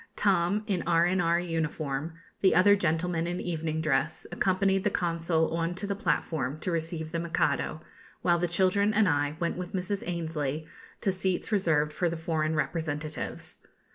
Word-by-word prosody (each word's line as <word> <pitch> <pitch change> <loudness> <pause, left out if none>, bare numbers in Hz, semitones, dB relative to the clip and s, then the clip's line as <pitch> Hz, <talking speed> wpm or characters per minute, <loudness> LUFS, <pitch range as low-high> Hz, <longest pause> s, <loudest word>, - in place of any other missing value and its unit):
Tom 195 +1 +2
in 190 -5 0
R.N.R. 170 0 +3
uniform, 160 -3 -2 0.3
the 190 - +4
other 200 +3 +7
gentlemen 170 -2 0
in 175 +1 -2
evening 160 -2 -2
dress, 140 -4 0
accompanied 190 0 +2
the 210 - +3
Consul 165 -3 0
on 165 +1 -1
to 195 - -4
the 200 - -1
platform 155 - -1
to 185 - -1
receive 160 -1 -2
the 170 - -1
Mikado; 165 -1 0 0.4
while 175 -1 +3
the 175 - +1
children 195 +4 +2
and 215 -2 +4
I 145 -2 +1
went 170 0 -1
with 180 -1 -6
Mrs. 190 +1 -1
Annesley 160 -3 -2 0.4
to 195 - +2
seats 185 +2 -1
reserved 155 -7 +2
for 175 +1 +1
the 170 - -4
foreign 160 -1 -1
representatives. 155 -1 -3
170 Hz, 160 wpm, -28 LUFS, 160-185 Hz, 0.4 s, other